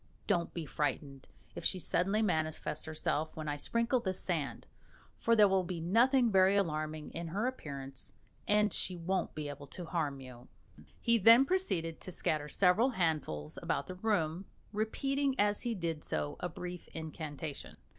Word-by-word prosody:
Don't 170 -1 +1
be 170 -2 -5
frightened 140 -2 -3 0.3
if - - -7
she 190 - +1
suddenly 195 +4 +1
manifests 155 -4 -1
herself 155 0 -2
when 155 -1 -5
I 145 - -1
sprinkle 235 - +1
this 190 -5 -2
sand, 165 -6 -2 0.5
for 230 - +3
there 210 -2 +7
will 190 -1 +2
be 175 -1 -4
nothing 235 - +4
very 190 0 +5
alarming 155 -5 -1
in 170 0 -4
her 200 +8 -1
appearance, 140 - -5 0.3
and 210 0 +4
she 185 - 0
won't 180 +1 -2
be 150 -1 -3
able 145 0 -7
to 175 +5 -7
harm 150 -5 -2
you." 125 -2 -11 0.5
He 235 -1 +3
then 230 +6 +8
proceeded 185 - 0
to 185 - -7
scatter 150 -3 -1
several 200 - +4
handfuls 155 - -1
about - - -1
the 185 - -6
room, 185 -3 0 0.3
repeating 270 +6 0
as 205 0 +2
he 240 -2 -1
did 165 -4 -3
so 145 - -2
a 180 - -2
brief 180 +1 -7
incantation. 155 -2 -6
175 Hz, 165 wpm, -33 LUFS, 155-210 Hz, 0.5 s, then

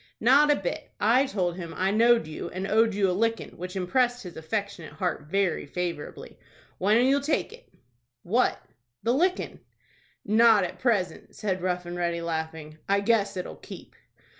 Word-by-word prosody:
"Not 275 +6 +5
a 295 - +5
bit; 185 -8 -4
I 250 +6 +4
told 180 -8 -1
him 170 -3 -7
I 190 +1 +1
know'd 230 +1 +4
you, 155 0 -6
and 185 +1 -4
owed 220 +1 +2
you 200 -1 +2
a 180 - +1
lickin', 230 +4 -1
which 180 +2 -7
impressed 245 +6 +1
his 180 - -9
affectionate 200 0 -4
heart 180 -6 -3
very 195 -2 0
favorably. 170 -1 -5 0.4
When'll 215 +6 +4
you 275 +2 +3
take 305 +9 -1
it?" - - -16 0.5
"What?" 235 +8 +1 0.4
"The 235 - +2
lickin'." 360 +7 0 0.7
"Not 220 -1 +5
at 180 - -5
present," 200 -9 -1
said 190 -4 -2
Rough 180 -1 -1
and 175 0 -6
Ready, 170 -1 -1
laughing. 160 -2 -5
"I 200 0 +3
guess 205 -2 +1
it'll 180 - -5
keep." - - -12
195 Hz, 165 wpm, -27 LUFS, 175-230 Hz, 0.7 s, Not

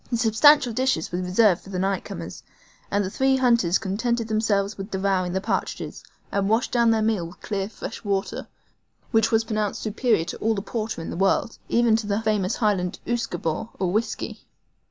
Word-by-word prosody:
The 235 - 0
substantial 245 +4 +5
dishes 255 -9 0
were 175 - -2
reserved 185 +1 +3
for - - -14
the 190 - -4
night 195 +1 0
comers, - - -7 0.5
and 205 0 +1
the 185 - -4
three 265 +3 +2
hunters 235 -9 +3
contented 230 +4 -1
themselves 215 -2 +1
with 195 +1 -7
devouring 190 -2 0
the 190 - 0
partridges, 215 - -3 0.3
and 200 0 0
washed 225 +3 +1
down 235 -1 +3
their 220 -1 +2
meal 215 -6 0
with 170 - -15
clear, 200 -2 -3
fresh 220 - -8
water, 200 -1 -2 0.6
which 225 -2 +3
was 225 0 +3
pronounced 215 -2 -2
superior 220 -4 +1
to - - -5
all 225 +1 0
the 195 - -3
porter 215 -7 -4
in - - -5
the - - -5
world, 195 +4 +1
even 235 -2 +4
to 220 -2 -4
the 205 0 0
famous 210 -4 +1
Highland 195 -5 0
USQUEBAUGH, 220 -6 -2
or 185 -2 0
whisky. 220 +4 -3
215 Hz, 190 wpm, -24 LUFS, 195-230 Hz, 0.6 s, substantial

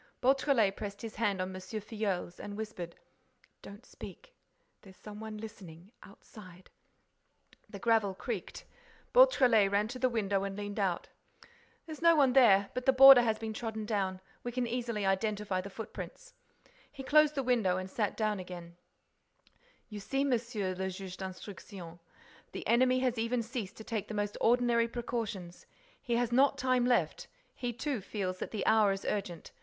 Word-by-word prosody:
Beautrelet 260 -6 +3
pressed 200 0 -7
his 225 -1 -7
hand 205 -4 0
on 185 +1 -3
M. 185 - -7
Filleul's 205 -2 -4
and 205 0 -7
whispered: 195 -6 -6 0.7
"Don't 205 +4 -12
speak—there's 210 - -15
some 210 -1 -10
one 220 -1 -7
listening—outside—" 195 -1 -13 1.0
The 205 - -8
gravel 215 -2 +2
creaked. - - -6 0.5
Beautrelet 255 - +6
ran 205 +1 +2
to 255 +2 -6
the 255 0 +2
window 200 -4 0
and 195 0 -4
leaned 205 0 -5
out: 190 -4 -1 0.8
"There's 315 -1 -9
no 335 0 +6
one 275 -4 +4
there—but 240 0 +4
the - - +8
border 270 -1 +10
has 220 -2 +1
been 220 0 -5
trodden 220 -1 -4
down—we 195 +2 -4
can 250 0 -1
easily 235 -3 -2
identify 200 -1 0
the 200 - -8
footprints—" 365 - -9 0.6
He 270 - -9
closed 300 +2 +4
the 275 - -1
window 225 -8 +2
and 185 0 -4
sat 205 +1 -2
down 215 -2 0
again: 175 -2 -9 1.1
"You 210 -2 -8
see, 270 +7 -1
Monsieur 230 -7 -1
le 190 +1 -3
Juge 185 -1 -7
d'Instruction, 185 -2 -9 0.5
the - - -6
enemy 255 +2 +3
has 250 -3 0
even 230 +1 0
ceased 225 -4 -6
to 220 - -9
take 215 -3 -3
the 215 - -6
most 205 0 -2
ordinary 235 0 +3
precautions—he 235 - -5
has 240 0 0
not 265 +3 +4
time 255 -1 +2
left—he 250 - -2
too 260 -1 -3
feels 185 -2 -4
that - - -4
the 215 - -4
hour 215 -2 +4
is 195 0 -4
urgent. 190 -5 -4
215 Hz, 155 wpm, -31 LUFS, 195-245 Hz, 1.1 s, border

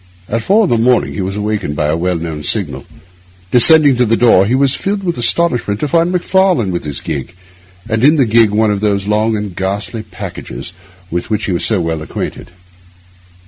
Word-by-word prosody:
At 115 +1 -2
four 210 - +3
in 190 - 0
the 120 - +2
morning 125 +2 +2
he - - -4
was 95 +1 -4
awakened 105 -8 -3
by 75 0 -1
the 75 - +1
well 90 +2 -1
known 80 -2 -5
signal. - - -2 0.7
Descending 145 +1 +6
to 125 - +2
the 115 +1 +2
door, 100 -5 +4
he 120 - +1
was 135 -1 +2
filled 200 0 -3
with 175 -2 -2
astonishment 120 -6 +1
to 150 - -1
find 170 +4 +1
Macfarlane 180 - +1
with 85 - -4
his 75 -2 -2
gig, 80 +4 -6 0.5
and 110 0 -1
in 150 +4 +5
the 140 -4 +3
gig 115 -1 +3
one 105 +1 +1
of 100 - -1
those 100 -2 -1
long 110 +1 0
and 105 -4 -6
ghastly 100 +4 -3
packages 95 - -8 0.4
with 85 +1 -3
which 110 -1 -1
he - - -2
was 85 - -1
so 110 -4 +1
well 80 -2 -3
acquainted. 80 - -6
110 Hz, 205 wpm, -14 LUFS, 95-125 Hz, 0.7 s, Descending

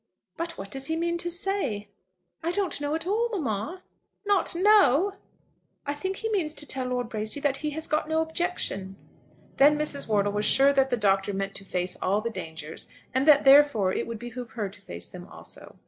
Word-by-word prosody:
"But 335 0 -5
what 195 +1 -8
does 270 0 -2
he 320 - -1
mean 340 +1 -1
to 345 - -2
say?" 340 - -1 0.5
"I 335 +1 -1
don't 375 -5 0
know 290 +1 -1
at 325 - -3
all, 445 +5 +1
mamma." 310 - -3 0.4
"Not 405 -4 +2
know!" 390 -3 +5 0.7
"I 285 - -1
think 375 +7 -3
he 450 +3 -3
means 330 -7 0
to 295 - 0
tell 260 -2 -2
Lord 250 -1 -2
Bracy 220 +3 -2
that 280 -2 +1
he 305 - -2
has 320 - +1
got 305 0 -1
no 315 0 +1
objection." 320 - -2 0.6
Then 295 +2 +6
Mrs. 295 -2 -1
Wortle 205 -2 +2
was 210 0 0
sure 275 +1 +5
that 270 -1 +3
the 245 - +1
Doctor 195 -1 +1
meant 195 0 -3
to 195 - -6
face 180 -1 -1
all 195 +3 +2
the 230 +2 -3
dangers, 160 -5 -7 0.3
and 260 +3 +1
that 290 -2 +7
therefore 270 -9 +6
it - - -2
would 230 -1 -5
behove 240 +1 -7
her 205 -3 -1
to 195 - -16
face 85 0 -7
them - - -11
also. - - -11
275 Hz, 205 wpm, -27 LUFS, 210-335 Hz, 0.7 s, that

